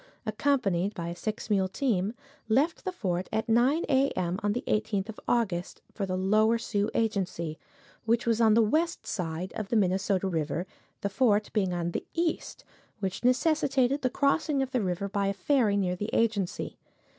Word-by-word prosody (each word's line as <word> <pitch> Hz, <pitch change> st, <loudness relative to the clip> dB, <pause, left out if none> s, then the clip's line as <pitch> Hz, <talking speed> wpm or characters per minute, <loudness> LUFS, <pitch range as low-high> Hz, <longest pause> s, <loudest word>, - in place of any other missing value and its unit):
accompanied 215 Hz, -5 st, +1 dB
by 170 Hz, -1 st, -4 dB
a 170 Hz, -, -5 dB
six 215 Hz, +4 st, -4 dB
mule 195 Hz, -3 st, +2 dB
team, 210 Hz, -1 st, 0 dB, 0.3 s
left 280 Hz, +9 st, +2 dB
the 375 Hz, -, -1 dB
fort 185 Hz, -, -2 dB
at 220 Hz, -, 0 dB
9:00 245 Hz, +8 st, +3 dB
a. 270 Hz, 0 st, +3 dB
m., 180 Hz, +1 st, -1 dB
on 205 Hz, 0 st, +1 dB
the 245 Hz, -, -3 dB
18th 210 Hz, -1 st, 0 dB
of 220 Hz, -, -7 dB
August, 190 Hz, -7 st, -1 dB
for 200 Hz, -2 st, -3 dB
the 185 Hz, 0 st, -1 dB
Lower 215 Hz, +4 st, +3 dB
Sioux 210 Hz, -2 st, -1 dB
Agency, 185 Hz, -8 st, -1 dB, 0.5 s
which 230 Hz, +1 st, +2 dB
was 230 Hz, 0 st, +2 dB
on 220 Hz, -2 st, +5 dB
the 230 Hz, -, +5 dB
west 325 Hz, +10 st, 0 dB
side 175 Hz, -1 st, -3 dB
of 215 Hz, -, -3 dB
the -, -, 0 dB
Minnesota 195 Hz, -1 st, +2 dB
river, 165 Hz, 0 st, -1 dB, 0.4 s
the 200 Hz, -, -1 dB
fort 210 Hz, 0 st, +2 dB
being 195 Hz, -4 st, +1 dB
on 175 Hz, -1 st, -2 dB
the -, -, -3 dB
east, 335 Hz, -1 st, -2 dB, 0.4 s
which 190 Hz, +1 st, -3 dB
necessitated 275 Hz, 0 st, +2 dB
the 255 Hz, -, +1 dB
crossing 280 Hz, +1 st, +1 dB
of 265 Hz, -, -5 dB
the 250 Hz, -, +1 dB
river 185 Hz, 0 st, -1 dB
by 200 Hz, 0 st, -1 dB
a 195 Hz, -, +1 dB
ferry 210 Hz, 0 st, +2 dB
near 180 Hz, -2 st, 0 dB
the 205 Hz, +4 st, -4 dB
agency. 215 Hz, -5 st, 0 dB
210 Hz, 180 wpm, -28 LUFS, 190-245 Hz, 0.5 s, on